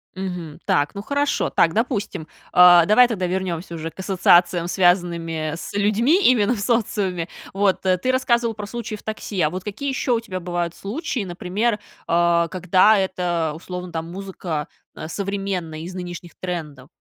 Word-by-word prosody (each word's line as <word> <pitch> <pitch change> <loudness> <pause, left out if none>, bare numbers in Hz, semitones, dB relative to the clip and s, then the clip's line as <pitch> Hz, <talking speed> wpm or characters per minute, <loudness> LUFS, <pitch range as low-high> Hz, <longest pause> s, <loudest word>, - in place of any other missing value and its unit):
Мгм. 180 -5 -5
Так, 145 +4 +1
ну 200 - -4
хорошо, 285 +6 0
так, 165 - +3
допустим. 215 - -2 0.3
Э, 175 -1 +8
давай 245 +4 +6
тогда 195 -6 -1
вернемся 175 -2 -3
уже 165 0 -5
к 190 - -22
ассоциациям, 175 -2 +3
связанными 170 -4 +1
с 170 - -8
людьми, 220 - +3
именно 240 -1 +4
в - - -6
социуме, 200 -7 0 0.3
вот, 195 -2 +1
ты 185 +7 +1
рассказывал 235 -3 +1
про 210 -1 -6
случаи 225 0 -5
в 210 - -13
такси, 215 -3 -4
а 150 - +3
вот 185 +2 -6
какие 245 +7 -4
еще 265 -1 0
у 230 - +2
тебя 185 -5 -5
бывают 175 -1 -3
случаи, 235 - -4
например, 195 +5 -1 0.3
э, 170 0 +3
когда 185 +4 +4
это, 175 -4 -1
условно, 180 +1 -7
там, 165 0 -4
музыка, 180 -5 -5 0.3
э, 155 - -7
современная, 195 -4 -3
из 180 +2 -7
нынешних 175 -1 -7
трендов? 155 -7 -5
185 Hz, 160 wpm, -22 LUFS, 170-210 Hz, 0.3 s, Э